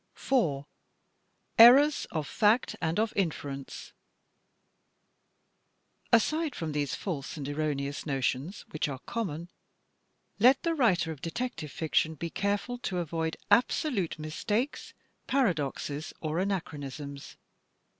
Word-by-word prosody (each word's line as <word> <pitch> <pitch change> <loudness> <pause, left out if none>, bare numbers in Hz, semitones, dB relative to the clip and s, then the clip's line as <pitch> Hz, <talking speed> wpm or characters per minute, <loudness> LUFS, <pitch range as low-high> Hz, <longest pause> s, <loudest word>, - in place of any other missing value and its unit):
4, 160 - +1 0.9
Errors 275 +6 +8
of 155 -3 -2
Fact 220 - +2
and 160 +1 0
of 220 0 +1
Inference 145 -7 -3 2.2
Aside 305 +6 +2
from 160 -2 -3
these 145 -2 -1
false 160 -6 -4
and 140 -2 -5
erroneous 145 -1 -2
notions 135 +5 -2
which 155 0 -1
are 135 - -4
common, 175 -8 -3 0.9
let 255 +5 +6
the 335 -1 +1
writer 185 - +2
of 150 -4 -9
detective 170 - -4
fiction 160 +1 0
be 165 +3 -5
careful 205 +5 -1
to 190 -6 -3
avoid 165 -1 -2
absolute 240 - +2
mistakes, 210 - -2 0.3
paradoxes, 155 - -1
or 155 +1 -2
anachronisms. 145 -7 -4
165 Hz, 105 wpm, -29 LUFS, 145-230 Hz, 2.2 s, Errors